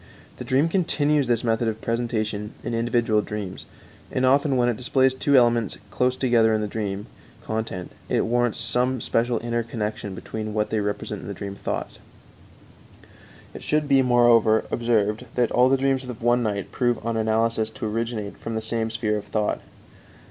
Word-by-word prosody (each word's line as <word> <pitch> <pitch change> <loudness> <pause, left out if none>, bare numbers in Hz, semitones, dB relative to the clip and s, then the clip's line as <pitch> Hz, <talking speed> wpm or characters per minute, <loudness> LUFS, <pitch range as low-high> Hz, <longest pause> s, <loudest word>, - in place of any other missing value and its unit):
The - - -6
dream 135 +5 +2
continues 150 -5 +1
this 120 -1 +1
method 115 0 +1
of 110 0 -2
presentation 110 -3 -2
in - - -3
individual 115 -2 +2
dreams, 105 -3 -6 0.4
and 130 - +1
often 140 +1 +3
when 120 -1 +3
it 120 - +1
displays 130 +2 +2
two 140 +2 +1
elements 120 -4 +3
close 125 0 +1
together 115 -4 +3
in 110 - 0
the 105 - -1
dream 100 -1 -3 0.4
content 110 -5 -4 0.2
it - - +2
warrants 120 0 +1
some 125 +1 0
special 115 +1 0
inner 120 0 0
connection 105 -3 -4
between 110 +3 -5
what 105 0 0
they 110 - +1
represent 105 0 -3
in - - -9
the - - -5
dream 100 -1 -6
thoughts. 100 - -5 1.5
It - - -9
should 150 -1 0
be, 135 -1 +5
moreover, 120 -3 +4
observed 110 -1 +1
that 120 -2 +2
all 125 +1 +4
the 135 - +4
dreams 135 0 +1
of 120 -3 -8
one 120 +1 +3
night 100 -4 -2
prove 120 -2 +1
on 115 0 -1
analysis 110 0 +1
to 110 0 -6
originate 110 -1 -3
from 115 - -5
the 110 - -1
same 110 0 -1
sphere 110 -2 -1
of 105 - -6
thought. 105 -1 -1
115 Hz, 175 wpm, -24 LUFS, 110-125 Hz, 1.5 s, be